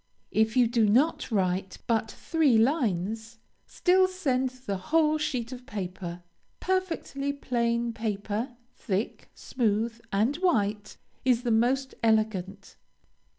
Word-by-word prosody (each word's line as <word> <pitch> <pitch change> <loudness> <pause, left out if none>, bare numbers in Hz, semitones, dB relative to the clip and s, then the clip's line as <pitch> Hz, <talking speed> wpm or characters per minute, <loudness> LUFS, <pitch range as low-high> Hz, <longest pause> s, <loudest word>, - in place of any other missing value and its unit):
If 220 +3 +2
you 250 - +6
do 230 -2 +2
not 275 +10 +2
write 190 -2 0
but 225 -1 +1
three 305 -5 +2
lines, 225 - 0 0.3
still 370 +1 +3
send 265 -9 0
the 250 -6 -5
whole 310 -1 +3
sheet 250 -5 -2
of 250 0 -9
paper. 180 -5 -5 0.4
Perfectly 350 -7 -1
plain 235 -4 -1
paper, 220 +2 -3 0.2
thick, 205 0 -3
smooth, 230 -1 -1
and 220 +9 +1
white, 210 - 0 0.3
is 250 -2 +2
the 240 - 0
most 255 +4 +2
elegant. 215 -3 0
235 Hz, 115 wpm, -28 LUFS, 210-265 Hz, 0.4 s, you